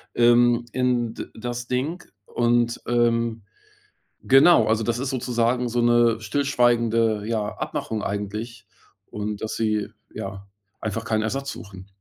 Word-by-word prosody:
ähm, 120 0 +4
in 125 -3 0
d - - -5
das 120 +1 -5
Ding 145 +8 -2 0.2
und, 120 +1 +1
ähm, 115 -2 +1 0.8
genau. 135 -3 +6
Also, 110 0 +1
das 120 +1 -1
ist 135 +1 -2
sozusagen 125 -1 0
so 120 +1 0
'ne 120 -1 +4
stillschweigende, 115 -5 +1
ja 110 -2 -1
Abmachung 110 -1 -4
eigentlich. 105 +3 -5 0.5
Und 105 0 -4
dass 110 - -3
sie, 105 -2 0 0.3
ja 95 0 -7 0.3
einfach 110 +1 -3
keinen 110 -1 0
Ersatz 135 +5 -3
suchen. 95 -2 -10
115 Hz, 130 wpm, -24 LUFS, 110-120 Hz, 0.8 s, genau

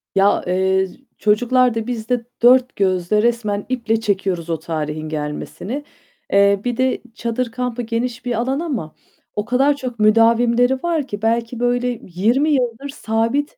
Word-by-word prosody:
Ya, 195 +1 +3
eee, 190 +1 +2 0.3
çocuklar 245 +3 +3
da, 225 +1 -3
biz 230 -2 -4
de 245 -2 0 0.2
dört 255 +1 +5
gözle 190 +1 +1
resmen 215 -4 0
iple 230 -3 0
çekiyoruz 190 -5 -1
o 165 -1 -1
tarihin 155 -1 -4
gelmesini. 155 - -5 0.5
Eee, 200 0 +4
bir 245 -1 -1
de 260 0 +1
çadır 235 0 -2
kampı 250 0 -3
geniş 235 +1 -3
bir 245 -2 -1
alan 260 +4 -1
ama 260 - -4 0.4
o 210 - -2
kadar 265 +4 +2
çok 250 -5 -6
müdavimleri 230 +3 +4
var 330 -5 0
ki 205 -3 -6
belki 230 +1 0
böyle 245 0 0
20 230 - +1
yıldır 255 0 -1
sabit 265 - -1
230 Hz, 150 wpm, -20 LUFS, 200-250 Hz, 0.5 s, dört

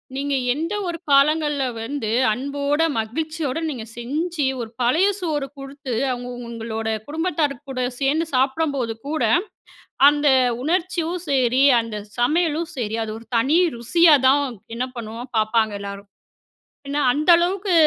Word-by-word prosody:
நீங்க 280 0 -1 0.2
எந்த 330 +7 -3
ஒரு 340 -1 -3
காலங்கள்ல 295 0 +3 0.2
வந்து, 230 -2 -3 0.2
அன்போட, 280 +5 -1 0.2
மகிழ்ச்சியோட, 310 +5 -3
நீங்க 240 -6 -5
செஞ்சு 300 +5 -2 0.2
ஒரு 225 - -6
பழைய 315 +11 +3
சோறு 300 -6 -2
கொடுத்து, 275 -2 -7 0.2
அவங்க 245 0 -5 0.2
உங்களோட 225 -1 -5 0.2
குடும்பத்தார் 310 -2 -1
கூட, 260 - -6 0.2
சேர்ந்து 295 +4 +1
சாப்படம்போது 265 -3 0
கூட 310 +1 -1 0.9
,அந்த 295 0 0 0.4
உணர்ச்சியும் 345 +1 -1
சரி, 260 -1 +3 0.2
அந்த 225 -2 -7 0.2
சமையலும் 320 +4 +1
சரி, 225 -1 -2
அது 215 -1 -5
ஒரு 230 - -14
தனி 280 +8 +3 0.2
ருசியா 320 +6 +5
தான் 285 +1 +4 0.3
என்ன 255 +2 -2
பண்ணுவோம் 230 +3 -7
பார்ப்பாங்க 220 0 +1
எல்லாரும். 200 0 -8 0.8
ஏன்னா 290 +1 -1
அந்த 305 +4 -1
அளவுக்கு 370 +2 0
280 Hz, 130 wpm, -22 LUFS, 240-320 Hz, 0.9 s, ருசியா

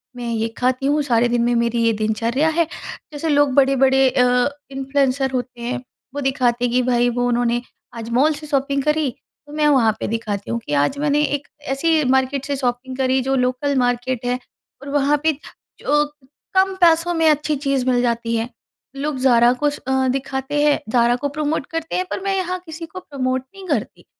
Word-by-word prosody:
मैं 240 -1 -5
ये 225 0 0
खाती 255 +1 0
हूँ, 295 +2 +2
सारे 240 -3 +2
दिन 240 0 +1
में 240 +1 +2
मेरी 235 0 +1
ये 230 0 +3
दिनचर्या 230 +7 0
है। 330 +1 +2 0.5
जैसे 300 +2 -3
लोग 290 -2 +3
बड़े-बड़े 270 -1 +4
अ, 250 +1 +3 0.2
इन्फ्लुएंसर 270 0 0
होते 250 -1 -4
हैं, 245 +2 -2 0.4
वो 285 - -2
दिखाते 250 -3 +1
हैं 240 - -1
कि, 250 - +3
भई 245 -1 +2
वो 245 0 0
उन्होंने 240 0 +1 0.3
आज 230 0 -6
मॉल 270 +7 +3
से 305 +1 -9
शॉपिंग 275 -1 0
करी, 300 -1 +1 0.4
तो 290 - -12
मैं 300 0 +2
वहाँ 255 -7 +4
पे - - -3
दिखाती 210 -3 -3
हूँ 235 - -1
कि 145 - -4
आज 145 - +1
मैंने 295 0 +2
एक 290 0 -2 0.3
ऐसी 315 +2 +2
मार्केट 265 +1 +1
से 285 0 -2
शॉपिंग 255 0 -2
करी 260 0 +2
जो 270 +1 0
लोकल 255 +3 0
मार्केट 245 0 0
है 250 +1 0 0.4
और 280 - -8
वहाँ 290 +1 +2
पे, 320 - +4 0.5
जो 295 +1 +2 0.5
कम 380 0 +3
पैसों 335 0 +4
में 325 -1 +3
अच्छी 300 0 +1
चीज़ 275 -2 -1
मिल 245 -1 +3
जाती 235 -1 0
है। 225 +1 -1 0.5
लोग 285 +1 -3
ज़ारा 240 -2 +5
को 295 +4 0
स 290 - -7
अ, 265 0 +2
दिखाते 270 +2 -2
हैं, 295 -1 +3
ज़ारा 240 +1 +3
को 285 +3 -3
प्रमोट 295 0 -2
करते 325 0 -3
हैं, 365 - 0
पर - - -2
मैं 390 0 0
यहाँ 365 -1 -2
किसी 325 0 -7
को 330 +3 -9
प्रमोट 260 -6 -2
नहीं 390 -1 -11
करती, - - -3
265 Hz, 200 wpm, -20 LUFS, 245-295 Hz, 0.5 s, ज़ारा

